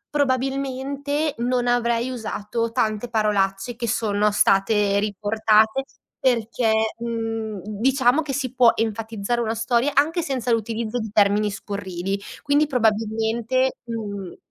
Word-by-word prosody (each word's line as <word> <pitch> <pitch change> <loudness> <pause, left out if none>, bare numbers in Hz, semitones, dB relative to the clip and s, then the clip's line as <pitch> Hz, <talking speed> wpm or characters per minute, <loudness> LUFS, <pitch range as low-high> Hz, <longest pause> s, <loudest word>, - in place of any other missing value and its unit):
Probabilmente 275 +2 -1
non 245 +1 0
avrei 240 0 +1
usato 230 -1 -3
tante 215 +1 -1
parolacce 210 0 0
che 235 0 -3
sono 210 -2 +1
state 200 0 +3
riportate 215 +4 +2 0.3
perché, 235 -2 +1 0.3
mhmm, 225 -2 -3
diciamo 250 +6 +2
che 290 - -4
si 260 -2 -3
può 245 -3 +5
enfatizzare 225 +1 -2
una 225 -1 -1
storia 235 +4 +1
anche 320 +5 +3
senza 260 -5 -2
l'utilizzo 230 +1 -1
di 220 -1 -4
termini 210 0 +3
scurrili. 195 -1 -4 0.2
Quindi, 290 +1 +3
probabilmente, 225 +1 0
mhmm, 205 -5 -5
230 Hz, 115 wpm, -23 LUFS, 210-255 Hz, 0.3 s, può